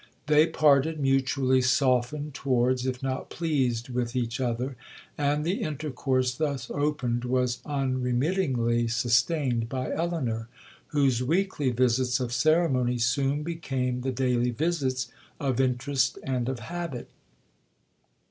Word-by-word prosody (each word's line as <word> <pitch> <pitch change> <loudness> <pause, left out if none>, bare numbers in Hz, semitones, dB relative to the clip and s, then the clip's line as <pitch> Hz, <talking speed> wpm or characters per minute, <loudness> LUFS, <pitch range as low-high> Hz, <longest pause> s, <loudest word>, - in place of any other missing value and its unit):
They 150 +1 +5
parted 155 0 +3
mutually 135 -1 +2
softened 130 +2 +1
towards, 130 -1 +1
if 130 0 -3
not 130 0 -3
pleased 130 -7 -1
with 120 -1 -2
each 120 -1 -1
other, 125 +2 -2 0.4
and 145 +1 0
the 185 +5 -1
intercourse 130 -4 -1
thus 140 -3 -3
opened 145 -5 -1
was 125 0 0
unremittingly 130 -2 0
sustained 120 +1 +1
by 130 0 -3
Elinor, 130 -10 -2 0.4
whose 135 -5 +2
weekly 160 0 0
visits 125 +1 +2
of 125 -2 -3
ceremony 130 -3 +2
soon 135 +5 +1
became 135 -6 -2
the 130 +1 -1
daily 125 -1 +1
visits 135 -2 -1 0.3
of 135 -3 0
interest 130 0 0
and 130 -2 -1
of 130 -3 -4
habit. 170 -1 -5
130 Hz, 120 wpm, -27 LUFS, 125-145 Hz, 0.4 s, They